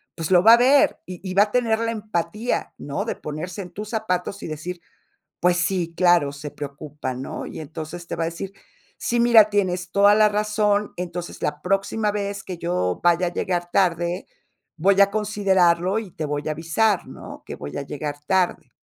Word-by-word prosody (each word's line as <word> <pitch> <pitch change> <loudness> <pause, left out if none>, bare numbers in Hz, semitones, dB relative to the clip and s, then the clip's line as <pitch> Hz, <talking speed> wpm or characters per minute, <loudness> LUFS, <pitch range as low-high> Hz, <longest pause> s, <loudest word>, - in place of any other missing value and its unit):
pues 165 +1 -4
lo 180 -1 +6
va 225 - +9
a - - +8
ver, 265 +4 +4
y 180 -1 -8
y - - -3
va 200 +2 +6
a 210 - -5
tener 230 -2 +1
la 230 0 0
empatía, 215 +1 -2
¿no?, 140 -1 -4
de - - -3
ponerse 160 +6 -6
en 180 -2 -9
tus 210 +3 -7
zapatos 200 -3 -2
y - - -4
decir: 165 +3 -6 0.6
"Pues 180 0 +3
sí, 175 -1 0
claro, 175 -5 +4
se 145 +1 -8
preocupa", 140 -2 -6
¿no? 130 +2 -6
Y - - -8
entonces 160 +2 -7
te - - -4
va - - -3
a - - 0
decir: 170 +4 -5 0.4
"Sí, 240 - -1
mira, 235 -3 +6
tienes 180 -3 0
toda 200 +2 +5
la 215 0 +5
razón, 210 0 +1
entonces 175 0 -6
la 150 0 -2
próxima 195 +3 0
vez 200 -1 -3
que 185 - -6
yo 130 - -1
vaya 175 +1 +3
a 175 - -3
llegar 175 -1 -2
tarde, 175 -1 +1 0.5
voy 195 +4 +3
a 200 0 +6
considerarlo 195 -3 +2
y 210 -6 -7
te 155 - -5
voy 145 0 -3
a - - 0
avisar, 170 +6 +1
¿no?, - - -10
que - - -7
voy 75 - -7
a - - -2
llegar 145 +1 -5
tarde". 180 -6 0
180 Hz, 195 wpm, -23 LUFS, 165-205 Hz, 0.6 s, va